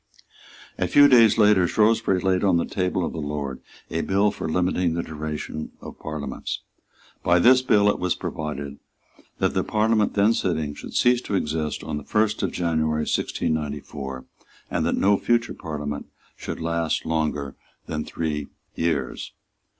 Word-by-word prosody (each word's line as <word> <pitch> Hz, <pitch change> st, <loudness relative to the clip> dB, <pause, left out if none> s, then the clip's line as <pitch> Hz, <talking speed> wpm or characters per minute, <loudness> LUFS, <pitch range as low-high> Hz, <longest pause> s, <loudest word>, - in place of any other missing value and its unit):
A -, -, +1 dB
few 145 Hz, 0 st, +7 dB
days 115 Hz, -6 st, +6 dB
later 105 Hz, -4 st, +5 dB
Shrewsbury 105 Hz, -2 st, +2 dB
laid 95 Hz, 0 st, +1 dB
on 95 Hz, -4 st, +4 dB
the 85 Hz, -, 0 dB
table 90 Hz, -2 st, -1 dB
of -, -, -4 dB
the 80 Hz, -, -4 dB
Lord 70 Hz, -3 st, -4 dB, 0.3 s
a 80 Hz, -, 0 dB
bill 100 Hz, +2 st, +2 dB
for -, -, -5 dB
limiting 90 Hz, 0 st, +1 dB
the 85 Hz, -, -1 dB
duration 75 Hz, 0 st, -5 dB
of -, -, -10 dB
Parliaments. 75 Hz, -3 st, -5 dB, 0.6 s
By 85 Hz, +1 st, +4 dB
this 130 Hz, +8 st, +6 dB
bill 105 Hz, -5 st, +3 dB
it 105 Hz, -, +2 dB
was 90 Hz, 0 st, 0 dB
provided 70 Hz, -2 st, -5 dB, 0.6 s
that -, -, +1 dB
the -, -, +1 dB
Parliament 110 Hz, -1 st, +1 dB
then 105 Hz, +2 st, +4 dB
sitting 80 Hz, -8 st, -1 dB
should -, -, -9 dB
cease 125 Hz, 0 st, +4 dB
to 100 Hz, -, -3 dB
exist 75 Hz, -3 st, -2 dB
on 75 Hz, -, -3 dB
the 75 Hz, -, -6 dB
first 105 Hz, +4 st, +1 dB
of 95 Hz, -, 0 dB
January 80 Hz, -3 st, 0 dB
1694, 75 Hz, -4 st, -3 dB, 0.5 s
and -, -, 0 dB
that -, -, 0 dB
no 100 Hz, +1 st, +4 dB
future 120 Hz, +2 st, +1 dB
Parliament 75 Hz, -2 st, -5 dB, 0.3 s
should -, -, -6 dB
last 85 Hz, -1 st, -1 dB
longer 75 Hz, -4 st, -1 dB, 0.3 s
than 75 Hz, -1 st, -3 dB
three 75 Hz, -3 st, -3 dB, 0.3 s
years. 75 Hz, -7 st, -2 dB
85 Hz, 160 wpm, -24 LUFS, 75-100 Hz, 0.6 s, few